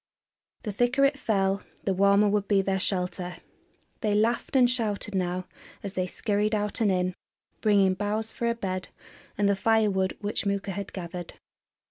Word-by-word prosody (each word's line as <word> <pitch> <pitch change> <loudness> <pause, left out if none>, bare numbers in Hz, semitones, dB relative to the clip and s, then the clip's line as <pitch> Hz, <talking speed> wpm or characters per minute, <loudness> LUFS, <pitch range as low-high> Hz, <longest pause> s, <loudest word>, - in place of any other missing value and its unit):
The 210 - -3
thicker 245 +6 +3
it 275 +1 +3
fell 195 -4 +1 0.2
the 195 - +1
warmer 200 +2 +4
would 205 -1 +1
be 200 -2 +3
their 190 0 0
shelter. 180 -2 -2 0.6
They 210 -1 +1
laughed 230 +5 +1
and 255 -2 +6
shouted 220 -4 -1
now 185 -1 -1 0.4
as 200 -2 -4
they 185 -2 -1
scurried 210 +2 0
out 210 +1 -1
and 210 -3 +4
in, 180 0 +1 0.5
bringing 200 -3 +4
boughs 210 +3 -2
for 235 - -2
a 235 - +1
bed 185 -4 -3 0.5
and 205 0 +3
the 200 - +3
fire 220 +1 +3
wood 190 -1 0
which 205 +1 -2
Mooka 200 -1 -1
had 200 +1 -5
gathered. 175 -1 -6
200 Hz, 170 wpm, -27 LUFS, 190-215 Hz, 0.6 s, and